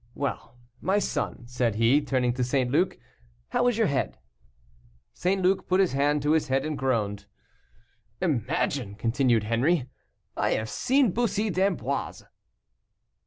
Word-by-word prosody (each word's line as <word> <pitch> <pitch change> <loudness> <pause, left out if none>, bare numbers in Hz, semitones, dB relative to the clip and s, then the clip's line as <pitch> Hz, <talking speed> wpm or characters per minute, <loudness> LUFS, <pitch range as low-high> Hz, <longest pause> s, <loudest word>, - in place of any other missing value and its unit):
Well, 140 -3 -4 0.3
my 190 +2 +1
son," 205 - -2
said 120 -3 -1
he, 115 +6 +4
turning 130 -4 0
to 125 0 -1
St. 125 0 0
Luc, 175 +7 +1 0.5
"how - - +1
is 245 -3 +1
your 225 - +3
head?" 140 -6 -1 1.0
St. 190 +2 0
Luc 185 +1 +2
put 185 +1 +2
his 190 -3 +3
hand 145 +1 +1
to 150 - +2
his 155 -1 +2
head 135 +1 0
and 155 -1 -2
groaned. 105 -7 -1 0.9
"Imagine!" 135 - -1
continued 115 0 +1
Henri, 125 +6 +1 0.5
"I - - +1
have 110 0 -2
seen 260 -3 +2
Bussy 215 -1 0
d'Amboise." 175 - -1
140 Hz, 140 wpm, -26 LUFS, 120-185 Hz, 1.0 s, he